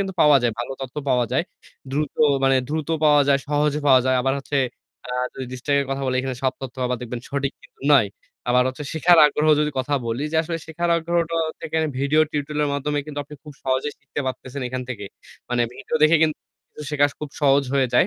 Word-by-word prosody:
কিন্তু 190 -1 -3
পাওয়া 150 -1 +7
যায়। 120 - +2
ভাল 120 - -3
তথ্য 130 +3 -8
পাওয়া 125 -2 +3
যায়। - - +2 0.5
দ্রুত 145 +1 -1 0.3
মানে 135 0 +4
দ্রুত 155 0 -3 0.2
পাওয়া 150 -1 +6
যায়, 140 - +5
সহজে 150 0 +1
পাওয়া 130 -2 +7
যায়। 130 - +3
আবার 135 +1 +1
হচ্ছে 140 +1 -3 0.5
আ - - -13 0.3
যদি 130 - -5
ডিস্ট্রাক্ট 140 +2 0
কথা 135 0 -2
বলে 130 - 0
এখানে 130 -1 -4
সব 130 - +2
তথ্য 130 -1 -7
আবার 125 0 -1
দেখবেন 120 0 -5
সঠিক 140 0 -1
কিন্তু - - -20
নয়। - - +5 0.4
আবার 125 +1 +4
হচ্ছে 140 +3 -6
শেখার 165 +2 +5
আগ্রহ 150 +1 +1
যদি 150 0 +1
কথা 135 +3 0
বলি 115 +4 -2
যে - - +1
আসলে 165 +1 -4
শেখার 170 +2 -2
আগ্রহটাও 165 -1 0
থেকে 160 - -7
আমি 160 - 0
ভিডিও 145 +3 +3
টিউটোরিয়াল 150 0 -2
এর 145 - -2
মাধ্যমে 145 +1 -1
কিন্তু 145 -1 -6
আপনি 150 +2 -11
খুব 150 - -10
সহজেই 130 +2 0
শিখতে - - -5
পারতেছেন 130 +1 -5
এখান 130 0 -4
থেকে। 115 -5 -5 0.5
মানে 120 -1 +2
ভিডিও 160 - -3
দেখে 155 +2 +6
কিন্তু 155 -1 +1 0.5
শেখা 145 -1 +4
খুব 150 - -5
সহজ 140 -1 +4
হয়ে 135 -2 +3
যায়। - - +5
145 Hz, 215 wpm, -22 LUFS, 130-155 Hz, 0.5 s, পাওয়া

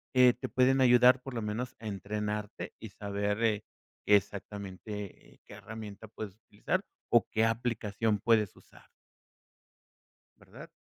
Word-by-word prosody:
eh, 125 -1 +7
te 125 - -6
pueden 130 +1 +3
ayudar 125 0 +6
por 135 0 -8
lo 115 - -1
menos 115 +4 -3
a 110 - -7
entrenarte, 105 +1 -4
y 110 - -8
saber, 100 +2 -2
eh, 110 -2 +2 0.4
qué 105 - +7
exactamente, 100 0 -4
eh, - - -31
qué - - -11
herramienta 110 -1 -9
puedes 105 -2 -7
utilizar, 110 - -2 0.3
o, 120 - +5
qué 110 0 +2
aplicación 115 -2 0
puedes 110 -2 +2
usar. - - -19 1.5
¿Verdad? - - -13
110 Hz, 140 wpm, -31 LUFS, 105-120 Hz, 1.5 s, eh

